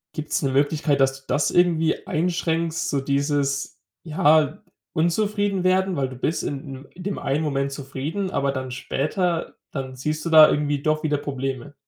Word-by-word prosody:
Gibt's 155 -1 -2
'ne 135 -3 0
Möglichkeit, 145 +1 +1
dass 135 0 +2
du - - -33
das 145 - +1
irgendwie 170 -2 +2
einschränkst, 165 0 -1
so 140 - 0
dieses, 140 0 -1 0.2
ja, 155 -3 +2 0.3
unzufrieden 200 +3 +1
werden? 185 0 +2
Weil 135 -3 -1
du 130 - -9
bist 155 +6 -1
in 135 -1 -6
i - - -25
in 180 - -9
dem 200 +1 -3
einen 145 +2 -1
Moment 140 -2 -1
zufrieden, 140 +8 -4
aber 140 0 0
dann 130 -1 -5
später, 155 +7 -2 0.2
dann 130 -2 -5
siehst 150 +5 -3
du - - -1
da 155 -1 +9
irgendwie 145 -1 0
doch 155 0 0
wieder 150 -2 +1
Probleme. 135 0 -4
150 Hz, 170 wpm, -23 LUFS, 135-165 Hz, 0.3 s, da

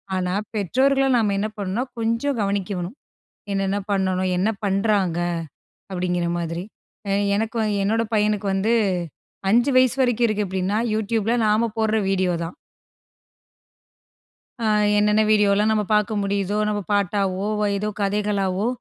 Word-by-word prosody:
ஆனா, 180 -1 -1 0.2
பெற்றோர்கள 265 +7 +2
நாம 210 -3 +1
என்ன 215 - 0
பண்ணணுனா, 200 +4 -2 0.2
கொஞ்சம் 230 +4 0
கவனிக்க 200 -1 -1
வேணும். 180 +9 -5 0.5
என்னென்ன 195 0 0
பண்ணணும் 185 -1 0
என்ன 200 +5 +2 0.2
பண்றாங்க? 195 -3 +1 0.7
அப்பிடிங்கிற 180 -2 -1
மாதிரி. 170 +1 -3 0.5
அ - - +1 0.2
எனக்கு 225 +2 -1 0.2
என்னோட 225 +3 +1
பையனுக்கு 210 -1 +1
வந்து. 210 +4 +1 0.8
5 240 +5 +4
வயசு 255 0 +4
வரைக்கும் 245 -2 +2
இருக்கு 210 -1 -1
அப்பிடின்னா, 190 +2 -1 0.2
Youtubeல 220 +1 0
நாம 220 +2 +2
போடுற 220 0 +1
வீடியோ 185 -2 +1
தான். 165 - -6 2.1
அ - - -2 0.3
என்னென்ன 210 +1 +3
வீடியோலாம் 210 0 +3
நம்ம 215 -1 +1
பார்க்க 210 +1 +1
முடியுதோ! 200 0 -1
நம்ம 210 -1 -1
பாட்டாவோ! 200 -1 0 0.3
ஏதோ 210 +2 -2
கதைகளாவோ! 200 -1 0
205 Hz, 125 wpm, -22 LUFS, 190-220 Hz, 2.1 s, 5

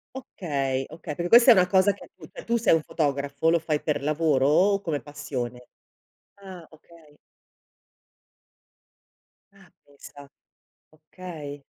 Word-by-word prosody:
Okay, 140 - -3
okay, 155 -1 -8
perché 175 0 -4
questa 240 +2 +8
è - - +10
una 180 -3 +3
cosa 190 +2 +3
che - - -15
tu - - -14
cioè - - -12
tu 235 0 0
sei 220 -6 +2
un 160 - +2
fotografo, 140 0 -1
lo 170 0 +3
fai 155 -2 -2
per 150 -2 -2
lavoro 150 -3 +1
o 195 +5 +3
come 155 -6 -3
passione? 130 -4 -7 0.7
Ah, 190 -4 -12
okay. 155 -1 -21 2.4
Ah, 195 -2 -21 0.2
pensa. 145 0 -15 0.6
Okay. 155 -3 -10
155 Hz, 130 wpm, -25 LUFS, 145-185 Hz, 2.4 s, è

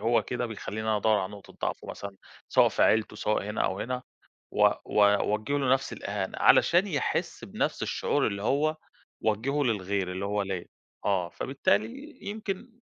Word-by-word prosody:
هو 115 +1 +3
كده 120 +4 -2
بيخلّيني 110 -1 -5
أنا 110 - +3
أدوّر 110 +1 +3
على 95 +1 -3
نقطة 100 -1 -12
ضعفُه - - -3
مثلًا، 100 -1 -7 0.3
سواء - - +5
في - - 0
عيلتُه 110 -1 +3
سواء 105 -1 0
هنا 105 +1 -3
أو 95 +1 -1
هنا 125 +1 -3 0.5
و - - +6 0.2
و 105 - +4
أوجّه 105 +6 +2
له 130 -2 +2
نَفْس 135 0 +1
الإهانة، - - -4
علشان 175 +4 +5
يحس 150 -9 -2
بنَفْس - - -2
الشعور - - +1
اللي 100 0 -2
هو 150 +7 +1 0.5
وجّهُه 130 +7 +1
للغير 100 -5 0
اللي 95 +2 -4
هو 105 0 0
ليّا، 95 -3 -4 0.4
آه 95 -4 +1
فبالتالي 110 -1 -1
يمكن 210 +2 -4
110 Hz, 170 wpm, -28 LUFS, 100-135 Hz, 0.5 s, و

